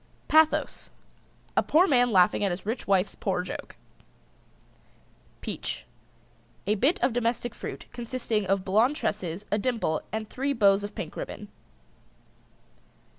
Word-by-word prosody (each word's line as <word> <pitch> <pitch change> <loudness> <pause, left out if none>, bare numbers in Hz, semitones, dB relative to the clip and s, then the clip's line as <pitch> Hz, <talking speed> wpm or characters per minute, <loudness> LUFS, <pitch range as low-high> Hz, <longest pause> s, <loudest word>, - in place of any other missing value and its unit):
PATHOS. 315 0 +3 0.7
A - - +5
poor 335 +4 +4
man 245 -7 +4
laughing 185 +1 +4
at 200 - +2
his 180 +1 -4
rich 225 +4 -3
wife's 195 0 +2
poor 185 -2 -1
joke. 180 - -7 1.7
PEACH. - - -5 0.8
A 205 - +2
bit 265 - +2
of 245 -1 +3
domestic 240 0 -1
fruit, - - -7
consisting 235 -4 -2
of 195 0 +1
blonde 220 +9 +3
tresses, 205 - -3
a 210 - +2
dimple, 210 -9 0
and 220 0 -3
three 275 +5 -1
bows 200 -4 +4
of 205 0 -6
pink 160 - -6
ribbon. 205 -1 -6
215 Hz, 130 wpm, -27 LUFS, 195-245 Hz, 1.7 s, A